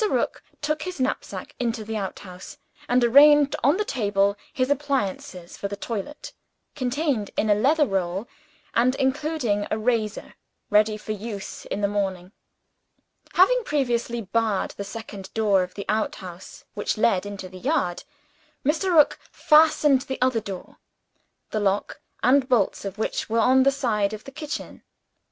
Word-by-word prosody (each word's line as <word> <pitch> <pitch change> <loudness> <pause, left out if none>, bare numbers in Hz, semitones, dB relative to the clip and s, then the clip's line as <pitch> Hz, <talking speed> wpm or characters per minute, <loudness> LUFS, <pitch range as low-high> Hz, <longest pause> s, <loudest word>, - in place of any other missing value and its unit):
Rook - - -1 0.2
took 305 +1 -1
his 365 -2 -5
knapsack 260 0 -3
into 230 -2 -1
the 220 +1 -5
outhouse; 190 -2 -7 0.3
and 245 0 +3
arranged 285 +4 +6
on 285 +7 +4
the 425 - -1
table 200 - +1 0.2
his 255 +1 0
appliances 210 -11 -2
for 200 - -2
the 200 - -5
toilet 225 +6 -6 0.4
contained 255 -4 -1
in 215 - +2
a - - +8
leather 290 +9 +3
roll, 195 0 -2 0.5
and 250 +3 +3
including 265 -6 0
a 215 - 0
razor 220 -2 -1 0.4
ready 215 +1 +4
for 215 - -7
use 210 -1 -6
in 205 - -4
the 200 - +2
morning. 190 -3 -2 1.0
Having - - +4
previously 240 - -1
barred 215 0 0
the 200 - -6
second 200 -2 -8
door 210 -4 +3
of 180 0 -5
the 200 - -6
outhouse, 190 -4 -4
which 205 - -2
led 195 -4 +2
into 200 -2 -7
the 185 0 -11
yard, 260 - -1 0.6
Mr. 335 +5 +1
Rook 300 -2 +5
fastened 300 -3 +4
the 265 +1 -5
other 255 -2 +2
door, 195 -4 -8 0.7
the 215 - -1
lock 200 0 -1 0.2
and 260 +2 +4
bolts 225 -5 +1
of 195 +1 -5
which 220 - -2
were 225 - 0
on 255 +3 +5
the 275 +1 +5
side 220 -7 0
of 215 - -7
the 275 - -10
kitchen. 300 +1 -6
225 Hz, 155 wpm, -24 LUFS, 200-275 Hz, 1.0 s, a